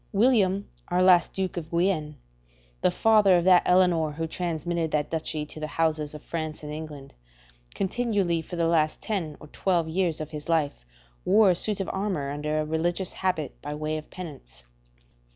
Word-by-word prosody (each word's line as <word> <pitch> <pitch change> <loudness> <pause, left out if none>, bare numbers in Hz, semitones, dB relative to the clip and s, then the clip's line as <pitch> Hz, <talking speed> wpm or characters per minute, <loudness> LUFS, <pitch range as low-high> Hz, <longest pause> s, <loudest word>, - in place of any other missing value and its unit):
William, 200 -3 +3 0.2
our 180 +1 +2
last 180 -2 +5
Duke 190 -2 -3
of 160 -2 -5
Guienne, 170 -4 0 0.7
the - - +4
father 210 -4 +4
of 170 - +1
that 180 0 +6
Eleanor 175 -4 +3
who 165 +2 -3
transmitted 170 0 -2
that 150 -1 -1
duchy 155 -2 -2
to 155 - -9
the 155 - -3
houses 155 -1 0
of 150 - -10
France 155 -2 -5
and 150 0 -6
England, 150 -3 -8 0.6
continually 195 -5 0
for 170 - -8
the 170 -1 +1
last 160 -2 +2
ten 175 -8 -3
or - - -11
twelve 175 -2 0
years 170 -1 0
of 155 -1 -6
his 150 +1 -7
life 150 - 0 0.4
wore 200 0 +5
a - - +1
suit 210 +3 0
of 195 - -2
armour 190 -8 -2
under 150 +1 -2
a 155 - -1
religious 175 +4 -1
habit 180 -7 -2
by 145 +1 -5
way 155 +1 -2
of 155 -1 -7
penance. 140 - -10
165 Hz, 180 wpm, -26 LUFS, 155-185 Hz, 0.7 s, that